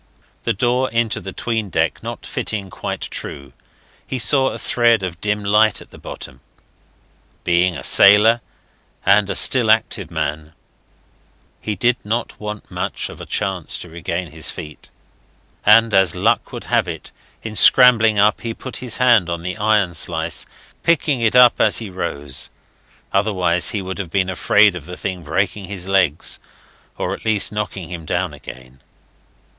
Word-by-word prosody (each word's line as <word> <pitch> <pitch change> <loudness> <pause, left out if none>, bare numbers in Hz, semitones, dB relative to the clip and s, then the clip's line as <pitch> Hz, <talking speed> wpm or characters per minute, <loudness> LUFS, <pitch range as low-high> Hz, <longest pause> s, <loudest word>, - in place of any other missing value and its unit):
The - - +1
door 125 +5 0
into 115 -1 -1
the 95 - -7
'tween 110 -1 -3
deck - - -1
not - - -7
fitting 100 -3 -4
quite - - -5
true, 70 -3 -6 0.5
he 130 - -3
saw 130 +3 +3
a - - -3
thread 115 -4 +2
of 90 -2 -6
dim 105 0 -1
light 105 +1 +3
at - - -15
the - - -14
bottom. 65 - -9 1.0
Being 90 0 +1
a - - -9
sailor, 110 +4 +6 0.6
and 100 0 +4
a - - -2
still 120 -4 +4
active 110 +1 +1
man, 75 +1 -4 1.1
he 105 - -3
did 120 +6 +1
not 115 +3 -3
want 105 0 -7
much - - -3
of - - -11
a - - -9
chance 95 -4 -2
to 90 - -8
regain 85 0 -5
his 80 -2 -2
feet; 75 -1 -9 0.8
and 115 +1 +6
as 95 -3 +3
luck - - 0
would - - -7
have - - 0
it, 80 -2 -7 0.3
in 110 -1 -6
scrambling 115 -1 +6
up 105 +1 +3
he 115 -1 -5
put 130 - -7
his 120 -3 -2
hand 120 -8 +3
on 85 -1 -4
the 90 +1 -4
iron 105 -4 +1
slice, 80 -3 0 0.3
picking 150 -6 +1
it 115 +1 +1
up 125 -1 +6
as - - +3
he 110 -4 -5
rose. 75 -7 -3 0.6
Otherwise 95 -1 +1
he 105 -4 -3
would 95 +1 -6
have 90 -4 -5
been 95 +1 0
afraid 105 +3 +3
of 85 -3 -9
the 90 - -8
thing 95 -3 -5
breaking 95 +5 -2
his 95 -1 -4
legs, 95 -6 +1 0.6
or - - -3
at - - -9
least 110 -2 +1
knocking 105 -5 -5
him 85 -2 -7
down 85 +1 -2
again. 65 -2 -12
100 Hz, 165 wpm, -19 LUFS, 85-110 Hz, 1.1 s, sailor